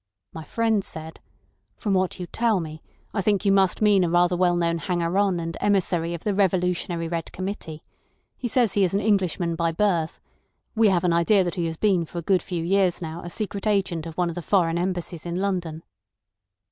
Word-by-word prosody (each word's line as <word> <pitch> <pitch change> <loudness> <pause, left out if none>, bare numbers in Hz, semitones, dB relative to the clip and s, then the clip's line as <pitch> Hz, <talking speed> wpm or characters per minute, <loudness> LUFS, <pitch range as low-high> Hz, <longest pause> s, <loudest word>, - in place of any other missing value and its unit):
My 160 - -7
friend 220 +4 0
said: 160 -2 -7 0.6
'From 205 - -1
what 185 0 0
you 180 - -4
tell 225 +2 +1
me 155 -1 -7 0.3
I 200 - 0
think 205 +1 +1
you 200 - +4
must 195 +1 +3
mean 205 -3 +5
a 175 - +1
rather 175 +1 +3
well 175 0 +2
known 170 -1 0
hanger 175 0 -1
on 195 -4 +2
and 165 0 -4
emissary 175 -4 +1
of 165 - -9
the 210 - 0
Revolutionary 180 -3 0
Red 165 -1 -4
Committee. 185 -5 -6 0.5
He 250 - -4
says 235 -3 +2
he 200 - +3
is 185 +1 +1
an - - +3
Englishman 185 -5 +1
by 165 0 0
birth. 170 -3 0 0.6
We 225 -1 +5
have 180 -2 +1
an 175 -2 +2
idea 185 +4 +4
that 175 - -2
he 175 -3 -1
has 160 -1 -5
been 190 -4 +2
for 175 - -10
a - - -1
good 185 +1 +2
few 170 -2 -4
years 185 0 +2
now 165 0 -6
a 175 - -7
secret 200 +2 -4
agent 185 -6 0
of 165 - -9
one 175 -1 +1
of - - -4
the 175 - -5
foreign 170 -2 +1
Embassies 175 -2 -3
in 170 - -3
London. 175 -4 -2
180 Hz, 210 wpm, -24 LUFS, 170-195 Hz, 0.6 s, mean